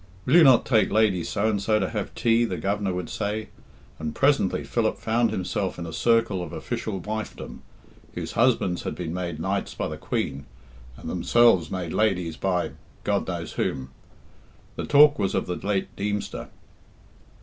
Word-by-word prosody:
"Will 130 - 0
you 175 - +8
not 130 -5 +6
take 110 -4 +3
Lady 105 -5 +3
So 105 +3 -1
and 105 -3 0
so 110 +1 +2
to 95 - -1
have 105 -3 -4
tea?" 115 0 +3
the 95 -6 -2
Governor 100 +2 -1
would 90 -1 -3
say; 105 +2 -3 0.5
and 80 -1 -4
presently 140 -8 +2
Philip - - 0
found 115 +1 +1
himself 90 -1 -2
in 85 - -5
a 80 - -7
circle 115 -5 +2
of 85 -3 -6
official 100 -4 -4
wifedom, 110 +4 -6 0.5
whose - - -4
husbands 115 -7 +2
had - - -4
been 85 -2 -4
made 85 -3 -4
Knights 95 +4 -2
by - - -2
the - - -6
Queen, 70 0 -3 0.5
and - - -9
themselves 115 -10 +3
made 90 -3 -4
Ladies 90 -7 +1
by 90 -1 -1 0.3
God - - 0
knows - - -4
whom. 65 0 -3 0.8
The - - -4
talk 145 0 +6
was 95 - 0
of - - 0
the 90 - -3
late 100 0 -2
Deemster. 105 0 -3
100 Hz, 170 wpm, -25 LUFS, 90-110 Hz, 0.8 s, you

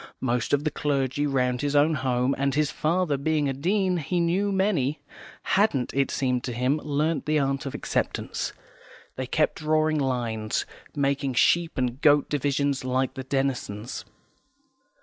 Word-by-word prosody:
Most 120 -2 0
of 145 0 +2
the 155 - 0
clergy 140 0 0
round 125 -3 0
his 145 0 -1
own 150 +3 +4
home 130 -1 +1
and, 140 0 0
his 150 -1 +1
father 160 -2 0
being 150 +1 0
a 135 - 0
Dean, 185 +6 +1
he 175 +3 -1
knew 180 +4 +1
many 185 -8 +1 0.4
hadn't, 190 - +1
it 135 -1 +1
seemed 125 -2 0
to 125 - -3
him, 125 +5 +1
learnt 150 +2 -1
the 155 0 +2
art 135 -1 0
of 135 - -5
acceptance; - - -2 0.6
they 130 -1 -4
kept 155 +4 +1
drawing 155 0 +2
lines, 120 -5 -1 0.3
making 140 -2 0
sheep 170 +6 +3
and 125 +1 -1
goat 145 -1 +4
divisions, 140 -1 0
like 130 +1 0
the 130 - -6
Denisons. 130 -5 -2
140 Hz, 155 wpm, -26 LUFS, 130-155 Hz, 0.6 s, own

